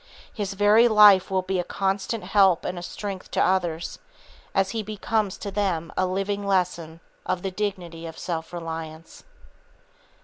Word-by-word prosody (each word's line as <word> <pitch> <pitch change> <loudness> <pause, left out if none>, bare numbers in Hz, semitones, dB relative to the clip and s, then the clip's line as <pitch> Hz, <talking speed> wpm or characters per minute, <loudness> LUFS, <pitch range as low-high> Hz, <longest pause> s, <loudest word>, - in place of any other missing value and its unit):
His 200 -3 -4
very 210 +4 +5
life 210 -4 +7
will 190 -1 0
be 185 0 -1
a - - 0
constant 195 +4 -2
help 195 -4 +3
and 180 -1 -3
a - - -8
strength 195 +1 -6
to - - -2
others, 175 -3 -1 0.6
as 195 0 +2
he 225 - -2
becomes 215 -1 -2
to 200 - -6
them 185 -5 -1
a 185 - +1
living 195 +2 -2
lesson 175 -4 -1 0.2
of 185 -1 -2
the 195 - -2
dignity 180 -5 -4
of 160 - -9
self 165 -2 -4
reliance. 165 -1 -7
190 Hz, 160 wpm, -25 LUFS, 175-205 Hz, 0.6 s, life